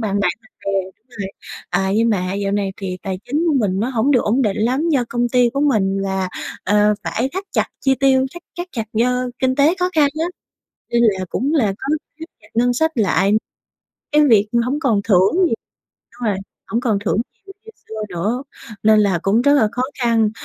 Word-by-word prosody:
bạn 205 -3 -1
bằng 180 - +2 0.3
bè 195 - 0 0.4
rồi. 200 -6 -6 0.4
Ờ, - - +1
nhưng 225 +2 +3
mà 185 -4 0
dạo 200 0 -1
này 200 -1 -1
thì 185 -2 -4
tài 190 -2 -3
chính 300 +6 -1
của 310 - +2
mình 195 -3 0
nó 230 - 0
hổng 245 +2 +1
được 255 -4 +4
ổn 240 +6 +2
định 210 -5 0
lắm, 255 +9 +1
do 275 -6 +2
công 240 0 0
ty 245 -1 +3
của 275 - -1
mình 210 -9 +2
là, 190 -1 -1 0.4
ờ, 210 +1 +3
phải 250 +4 -1
thắt 380 +2 -4
chặt - - +1
chi 270 -1 +3
tiêu, 265 -1 +4
thắt 345 - -9 0.2
thắt 350 +1 -4
chặt 225 -3 -3
do 250 +3 +1
kinh 260 0 +1
tế 290 +4 +4
khó 360 0 +1
khăn 300 -3 +4
á - - +2 0.7
nên 235 0 +2
là 195 -4 +2
cũng 280 +6 -1
là 270 -9 +3
có 265 - -6 0.3
thắt 325 - -6
chặt 210 - -20
ngân 245 +2 +3
sách 320 +6 +1
lại 195 - +2 0.8
cái 300 0 +5
việc 210 -3 +4 0.2
hổng 280 +4 -1
còn 230 -9 +1
thưởng 190 - +4
nhiều 275 - +1 0.7
đúng 240 - -2
rồi, 200 - 0 0.3
hổng 230 - -1
còn 225 -5 +1
thưởng - - +1 0.3
nhiều 390 - -10
như 445 - -11 0.2
xưa - - -8 0.2
nữa. 210 +9 -2 0.4
Nên 215 0 +5
là 195 -4 +2
cũng 210 +5 +2
rất 285 +2 +4
là 240 -7 +4
khó 250 - -1 0.2
khăn, 225 -2 +3
230 Hz, 215 wpm, -19 LUFS, 200-265 Hz, 0.8 s, cái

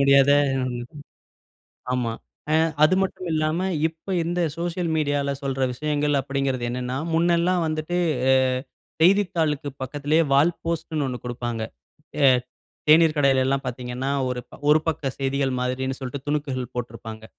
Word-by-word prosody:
முடியாத 140 0 +6 1.6
ஆமா. 120 -3 -1 0.4
அ - - +3 0.3
அது 175 +5 +5
மட்டும் 185 -1 -3
இல்லாம 155 +4 0 0.2
இப்ப 165 +4 -9
இந்த 175 +1 -1 0.2
சோசியல் 170 0 -2
மீடியால 145 -2 0
சொல்ற 135 -1 -2
விஷயங்கள் 145 +1 0
அப்பிடிங்கிறது 135 -2 -2
என்னன்னா, 125 +1 -3 0.2
முன்னெல்லாம் 170 +1 +2
வந்துட்டு 155 +3 -2 0.3
அ 130 - +6 0.7
செய்தித்தாளுக்கு 165 -6 +2
பக்கத்திலே 145 +4 0
வால் 150 +5 +4
போஸ்ட்ன்னு 160 -3 -2
ஒண்ணு 125 -1 -3
கொடுப்பாங்க. 120 -2 -3 0.6
ஏ - - +8 0.6
தேனீர் 160 0 +6
கடையில 135 -2 +3
எல்லாம் 135 +1 0
பார்த்தீங்கன்னா, 125 +2 -4 0.2
ஒரு 125 -1 -2 0.3
ஒரு 150 +1 +7
பக்க 145 -4 -1
செய்திகள் 135 0 0
மாதிரின்னு 130 +1 -2
சொல்ட்டு 130 +1 -4
துணுக்குகள் 135 -4 -2
போட்டிருப்பாங்க. 110 -2 -6
140 Hz, 125 wpm, -24 LUFS, 130-160 Hz, 1.6 s, ஏ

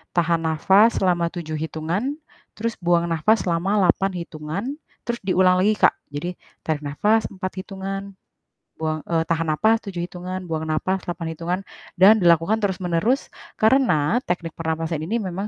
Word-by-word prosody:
tahan 170 -1 +2
napas 190 +8 +4
selama 175 -3 +2
7 165 -2 -5
hitungan, 165 - -2 0.4
terus 230 +1 -2
buang 170 -1 +2
napas 210 +8 +2
selama 175 +1 0
8 190 +2 +2
hitungan, 155 +4 -5 0.4
terus 235 0 -3
diulang 185 -1 +3
lagi, 210 +3 +3
Kak. - - +5 0.2
Jadi 150 +5 -5 0.3
tarik 155 -2 -1
napas 210 +10 +1
4 185 -1 -5
hitungan, 195 0 -6 0.6
buang 155 0 -1
eee, 165 -1 0
tahan 165 -1 0
napas 220 +9 +3
7 190 -4 -6
hitungan, 180 +1 -6
buang 160 -1 -2
napas 185 +5 -1
8 170 -1 -4
hitungan, 175 +3 -2 0.4
dan 200 +4 +8
dilakukan 170 +5 +4
terus-menerus. 190 +5 0 0.3
Karena 225 - +3
teknik 170 -2 -3
pernapasan 160 -1 -2
ini 225 +8 -1
memang 195 0 -4
180 Hz, 145 wpm, -23 LUFS, 165-195 Hz, 0.6 s, dan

